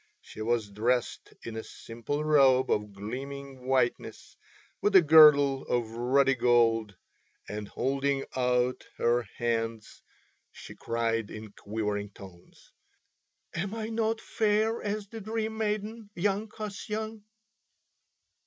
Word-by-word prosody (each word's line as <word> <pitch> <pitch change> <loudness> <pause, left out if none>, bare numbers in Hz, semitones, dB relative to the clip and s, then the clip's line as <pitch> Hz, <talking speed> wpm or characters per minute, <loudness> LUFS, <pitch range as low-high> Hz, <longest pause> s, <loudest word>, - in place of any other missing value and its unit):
She - - -11
was 110 -2 -1
dressed 120 +4 -1
in 115 - -7
a 110 - -5
simple 120 +6 -5
robe 135 -4 +4
of 105 0 0
gleaming 130 +5 -7
whiteness 130 -2 -1 0.5
with 205 -1 +1
a 190 - +10
girdle 145 -3 +7
of 120 -2 -1
ruddy 135 +4 +2
gold, 115 -4 +2 0.5
and 105 0 -5
holding 135 +3 -1
out 125 0 +1
her 120 +1 +2 0.2
hands 115 -2 -3 0.5
she - - -11
cried 115 -2 -2
in 110 -1 -9
quivering 105 0 -3
tones: 95 -3 -15 0.8
"Am 195 +5 -3
I 220 -1 -4
not 225 0 0
fair 220 +1 0
as 210 0 -3
the 225 +2 -9
Dream 220 +1 -3
Maiden, 215 0 -3
young 200 +4 0
Kasyan?" 215 +1 -6
130 Hz, 115 wpm, -28 LUFS, -, 0.8 s, a